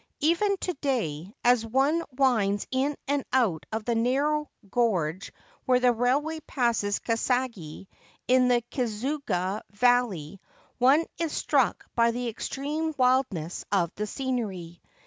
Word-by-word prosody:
Even 345 +6 +2
to 360 - -1
day, 195 - -2
as 245 -1 +4
one 270 +8 +1
winds 225 -7 +2
in 275 +2 0
and 285 -1 0
out 195 -13 +1
of 220 0 -3
the 240 - +1
narrow 280 +6 +1 0.2
gorge 190 -7 0 0.3
where 250 -1 +4
the 250 -1 +4
railway 280 +7 0
passes 230 -5 0
Kasagi, 230 -8 -2 0.4
in 255 0 +4
the 240 -1 +3
Kizugawa 225 -5 -2
valley, 205 -7 +1 0.4
one 275 +6 +5
is 330 -2 -1
struck - - +1
by 235 0 +3
the 245 +1 -2
extreme 295 +7 -3
wildness 250 - +1
of 180 -4 +1
the 210 +1 -4
scenery. 205 - -4
245 Hz, 125 wpm, -27 LUFS, 205-270 Hz, 0.4 s, one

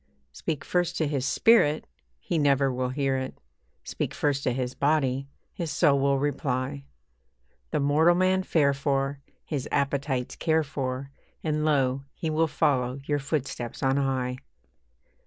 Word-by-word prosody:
Speak 140 - -4
first 175 -1 0
to 160 - +1
his 140 -2 -1
spirit, 155 -10 +4 0.3
he 170 - -2
never 140 -2 +3
will 125 0 -1
hear 135 0 0
it; 130 0 -5 0.4
Speak - - -4
first 145 -2 0
to 125 - +2
his 125 0 -2
body, 140 -2 +1 0.2
his 170 -2 -4
soul 145 -3 +3
will 140 0 +2
reply; 140 -1 -2 0.8
The - - 0
mortal 155 +5 +4
man 185 +1 +3
fare 150 -6 +2
for, 140 0 -1 0.2
his 140 -5 -3
appetites 140 -2 -1
care 160 -1 +2
for, 135 -2 -4 0.3
And 150 -1 0
lo! 135 -3 +1
he 160 - -3
will 160 +1 +2
follow 140 -4 +1
your 145 0 0
footsteps 135 -5 -3
on 135 +1 +2
high. 130 -2 0
140 Hz, 145 wpm, -27 LUFS, 130-155 Hz, 0.8 s, spirit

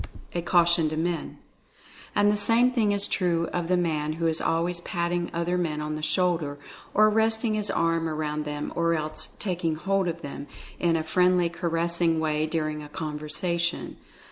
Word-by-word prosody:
A 175 - -1
CAUTION 170 -2 +3
TO 155 - -4
MEN. 170 +1 -2 0.8
And 205 0 +4
the - - +1
same 230 +4 +5
thing 225 -5 +2
is 200 0 +3
true 170 -3 0
of 175 -2 -1
the 180 +1 +2
man 155 -3 0
who 165 +1 -3
is 160 -1 +1
always 170 +1 0
patting 175 0 -2
other 170 +2 -1
men 155 -3 -1
on 150 0 -3
the 155 - -4
shoulder, 165 -3 0 0.4
or 215 +1 +6
resting 220 +1 +1
his 210 -1 -1
arm 165 -1 +1
around 150 -1 -3
them, 150 0 -4
or 170 0 +2
else 155 0 -4
"taking 175 -5 -1
hold 195 +3 0
of 170 0 -4
them" 140 0 -7 0.3
in 170 -1 +2
a 160 - 0
friendly 180 +1 +3
caressing 170 -1 0
way 155 0 0
during 155 -1 -2
a 150 - -10
conversation. 160 +3 -3
170 Hz, 175 wpm, -26 LUFS, 155-180 Hz, 0.8 s, or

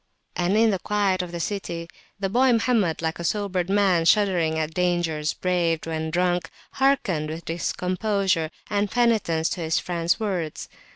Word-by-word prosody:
And 180 +4 +1
in 225 0 +4
the 190 - -1
quiet 200 -2 +1
of 180 -1 -6
the 170 - -5
city 170 -3 -4 0.3
the 195 - 0
boy 250 +6 +3
Mohammed, 220 -9 +1
like 160 +1 -2
a - - -4
sobered 185 0 -1
man 195 -4 +3
shuddering 175 -5 +3
at 160 0 -2
dangers 175 -4 0
braved 170 -3 0
when 160 -1 -3
drunk, 175 +1 0 0.2
hearkened 200 - +1
with 160 +2 -6
discomposure 180 0 -1 0.2
and 205 -1 0
penitence 210 -9 +2
to 175 - -4
his 160 0 0
friend's 170 +1 0
words. 185 -8 -3
180 Hz, 160 wpm, -24 LUFS, 165-205 Hz, 0.3 s, in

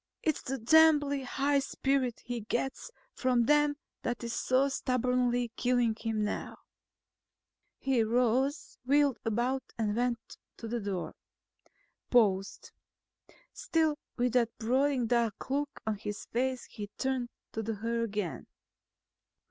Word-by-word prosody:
Its 310 -3 +1
the 270 +1 -3
damnably 290 +2 +5
high 280 +2 +1
spirit 270 -2 -1
he 240 -1 -3
gets 250 - -3 0.2
from 250 -2 +2
them 295 +1 +4 0.3
that 240 0 -3
is 235 0 -3
so 260 +2 +2
stubbornly 250 -2 0
killing 245 -2 +2
him 220 -1 -2
now." 210 - -3 1.2
He 265 -3 +1
rose, 250 +5 +1
wheeled 280 0 +3
about 240 +4 0 0.2
and 210 -2 0
went 240 -1 -2 0.2
to 230 - -7
the 235 +1 -2
door. 200 -4 -3 1.0
Paused. 200 -5 +2 0.8
Still 325 -10 +1 0.2
with 245 -1 +1
that 240 -2 +3
brooding 255 +2 +1
dark 235 0 0
look 285 +1 -1
on 220 -1 -1
his 210 -1 -5
face 255 +1 -1
he 210 -2 -7
turned 260 -2 -1 0.2
to 225 - -3
her 225 +2 -2
again. 210 -6 -3
245 Hz, 125 wpm, -31 LUFS, 225-270 Hz, 1.2 s, damnably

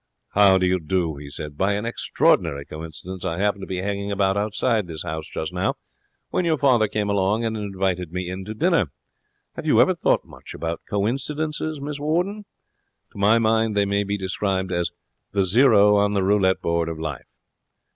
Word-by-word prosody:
'How 100 -2 +5
do 90 - +1
you 90 0 +2
do?' 80 -1 -1
he 70 0 -9
said. 75 +1 -7
'By 100 +2 +2
an 105 +2 -2
extraordinary 70 -10 +1
coincidence 80 +4 -8
I 85 -3 -2
happened 100 0 0
to - - -6
be 95 -1 -3
hanging 100 0 -2
about 95 -1 +1
outside 105 0 0
this 80 -2 -5
house 80 -2 -5
just 80 +2 -4
now, 90 +1 0 0.6
when - - +1
your 165 -2 +2
father 125 -6 +4
came 105 0 -2
along 100 +3 +1
and 110 0 -1
invited 95 -4 -2
me 90 0 -3
in 90 +1 -5
to 110 +2 -6
dinner. 165 - +2 0.6
Have - - -6
you - - +4
ever - - +5
thought - - +1
much - - -11
about 85 0 -4
coincidences, 150 +8 -2
Miss 145 +1 -5
Warden? 180 +8 -1 0.7
To - - -11
my 105 +3 +5
mind, 110 -1 +2
they 100 - +3
may 100 +1 +1
be 100 +1 -2
described 95 0 -2
as 85 -1 0 0.4
the 100 -1 +2
zero 105 0 +5
on 100 0 +2
the 100 -2 +1
roulette 95 -1 +2
board 85 0 0
of 80 - -5
life.' 80 -4 -6
100 Hz, 190 wpm, -23 LUFS, 90-110 Hz, 0.7 s, How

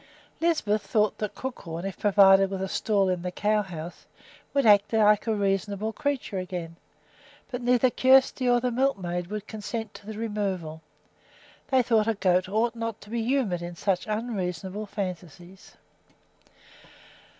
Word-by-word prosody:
Lisbeth 300 -11 +1
thought 210 -1 0
that 210 -1 -4
Crookhorn, 170 -10 -6
if 195 -2 -5
provided 195 -1 +5
with 190 -1 -3
a - - -2
stall 200 0 +1
in 180 -1 -1
the 180 - -3
cow 210 +3 +1
house, 175 -3 -8 0.4
would 280 -2 +1
act 205 -2 +5
like 210 -1 +3
a 220 - +1
reasonable 200 +2 -1
creature 275 -9 -2
again. 175 -2 -6 0.8
But 250 -1 -4
neither 245 +1 +3
Kjersti 260 0 +4
nor 245 0 +4
the 250 0 -1
milkmaid 185 -9 -1
would 210 +1 -5
consent 220 0 -5
to 205 - -13
the 220 -1 -6
removal; 195 -8 -3 0.9
they 260 -2 +3
thought 225 -2 +2
a 225 - +1
goat 185 -1 +1
ought 225 +3 +1
not 230 -2 -4
to 205 - -13
be 235 -1 -1
humored 230 -8 0
in 175 0 -6
such 185 +2 -1
unreasonable 205 -3 -3
fancies. 185 -2 -7
210 Hz, 150 wpm, -26 LUFS, 185-230 Hz, 0.9 s, provided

